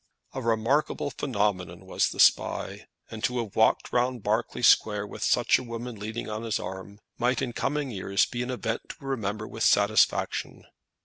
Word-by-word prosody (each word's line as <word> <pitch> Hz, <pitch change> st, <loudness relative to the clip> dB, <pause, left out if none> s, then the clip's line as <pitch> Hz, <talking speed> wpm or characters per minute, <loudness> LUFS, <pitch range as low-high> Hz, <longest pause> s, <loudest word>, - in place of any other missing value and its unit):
A 130 Hz, -, -4 dB
remarkable 115 Hz, +6 st, 0 dB
phenomenon 105 Hz, -, -2 dB
was -, -, +1 dB
the -, -, -9 dB
Spy, -, -, +2 dB, 0.2 s
and 110 Hz, -1 st, -7 dB
to 125 Hz, -, 0 dB
have 115 Hz, -4 st, -4 dB
walked 110 Hz, -, +2 dB
round 125 Hz, -2 st, 0 dB
Berkeley 110 Hz, +3 st, -1 dB
Square 105 Hz, -3 st, +4 dB
with -, -, -10 dB
such -, -, +3 dB
a -, -, -7 dB
woman 120 Hz, 0 st, -6 dB
leaning 110 Hz, +3 st, -5 dB
on 110 Hz, 0 st, -4 dB
his 115 Hz, -2 st, -1 dB
arm, 95 Hz, +2 st, -8 dB, 0.2 s
might 125 Hz, +1 st, +1 dB
in 120 Hz, -, -2 dB
coming 145 Hz, 0 st, -2 dB
years 100 Hz, -1 st, +1 dB
be 120 Hz, -, -5 dB
an 125 Hz, -, -3 dB
event 120 Hz, -2 st, -2 dB
to 140 Hz, -, -10 dB
remember 110 Hz, -5 st, -3 dB
with 110 Hz, -, -9 dB
satisfaction. 105 Hz, 0 st, +2 dB
115 Hz, 175 wpm, -27 LUFS, 105-125 Hz, 0.2 s, Square